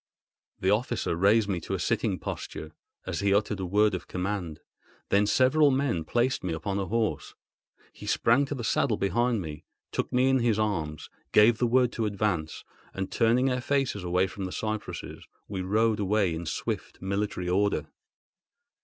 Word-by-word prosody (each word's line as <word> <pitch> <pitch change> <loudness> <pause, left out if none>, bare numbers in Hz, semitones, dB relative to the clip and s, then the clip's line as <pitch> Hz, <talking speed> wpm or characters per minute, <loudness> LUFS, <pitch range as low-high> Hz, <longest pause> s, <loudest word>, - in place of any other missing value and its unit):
The - - +2
officer - - 0
raised 100 +4 +4
me 95 -4 -1
to - - -3
a - - -4
sitting - - 0
posture, 80 - -6 0.3
as - - -3
he 100 0 +1
uttered 105 -1 0
a 95 - -3
word 105 +3 +3
of 90 - -4
command; 90 -4 -3 0.5
then 100 +1 +3
several 130 +6 +4
men 130 - 0
placed 120 +8 0
me 90 -3 -2
upon 95 +5 -2
a 95 - -2
horse. 115 +2 -1 0.6
He - - -11
sprang 125 +5 +3
to 145 - -4
the 120 - -5
saddle 110 0 +1
behind 120 +2 +1
me, 75 -1 -7 0.3
took - - -2
me 125 +1 +3
in 135 0 +3
his 115 -3 +2
arms, 85 -9 -2 0.2
gave 110 +2 +6
the 120 - +2
word 125 0 +3
to 115 -3 -1
advance; 100 -6 -2 0.3
and, 95 0 -3
turning 125 +4 +3
our 125 0 -1
faces 135 -7 0
away 90 +1 +2
from 95 0 -6
the 90 - -5
cypresses, 110 +1 -5 0.2
we 95 -2 -4
rode 110 +3 +1
away 100 -3 +1
in 80 0 -5
swift, - - -4
military 100 -1 -2
order. 100 +3 +1
105 Hz, 175 wpm, -27 LUFS, 95-120 Hz, 0.6 s, gave